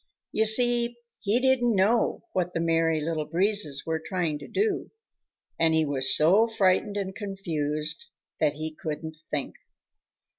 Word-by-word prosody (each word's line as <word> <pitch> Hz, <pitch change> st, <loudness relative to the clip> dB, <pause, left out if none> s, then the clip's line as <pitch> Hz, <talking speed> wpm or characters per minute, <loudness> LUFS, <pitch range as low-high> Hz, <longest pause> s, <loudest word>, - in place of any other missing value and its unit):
You 220 Hz, -, +1 dB
see, 240 Hz, +1 st, +4 dB, 0.2 s
he 215 Hz, +3 st, +1 dB
didn't 250 Hz, -3 st, +2 dB
know 215 Hz, +5 st, +1 dB
what 180 Hz, -1 st, -1 dB
the -, -, -2 dB
Merry 165 Hz, -1 st, +1 dB
Little 155 Hz, 0 st, -2 dB
Breezes 175 Hz, -5 st, +1 dB
were 160 Hz, -1 st, -2 dB
trying 170 Hz, -6 st, -2 dB
to 145 Hz, -, -10 dB
do, 415 Hz, -1 st, -1 dB, 0.7 s
and 160 Hz, -1 st, +3 dB
he 160 Hz, -1 st, +2 dB
was 135 Hz, -2 st, +3 dB
so 190 Hz, +9 st, +4 dB
frightened 205 Hz, -1 st, +1 dB
and 190 Hz, -1 st, -4 dB
confused 160 Hz, -7 st, -3 dB, 0.3 s
that 150 Hz, -2 st, +2 dB
he 155 Hz, +1 st, -5 dB
couldn't 155 Hz, 0 st, -6 dB
think. 145 Hz, -3 st, -3 dB
170 Hz, 145 wpm, -26 LUFS, 155-215 Hz, 0.7 s, see